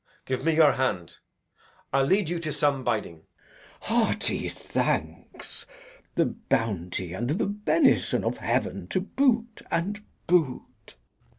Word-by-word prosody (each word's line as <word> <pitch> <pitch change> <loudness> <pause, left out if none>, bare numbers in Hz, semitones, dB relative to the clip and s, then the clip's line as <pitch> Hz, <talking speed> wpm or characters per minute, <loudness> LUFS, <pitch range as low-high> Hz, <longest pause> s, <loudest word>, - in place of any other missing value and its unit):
Give 130 -1 -2
me 165 -1 +2
your 155 -2 +7
hand; 90 -10 -2 0.7
I'll 135 0 +4
lead 190 +4 +3
you 175 +1 -2
to 155 -2 -3
some 140 -2 +1
biding. 105 -8 -1
Glou. 80 - -26 0.7
Hearty - - +1
thanks. - - -3 0.5
The - - +3
bounty 90 -5 -2
and 120 +6 -2
the 165 +9 +1
benison 210 +10 +2
of - - -1
heaven - - -1
To - - 0
boot, 235 -4 +1
and 200 +5 -1 0.2
boot! 155 - 0
150 Hz, 125 wpm, -27 LUFS, -, 0.7 s, your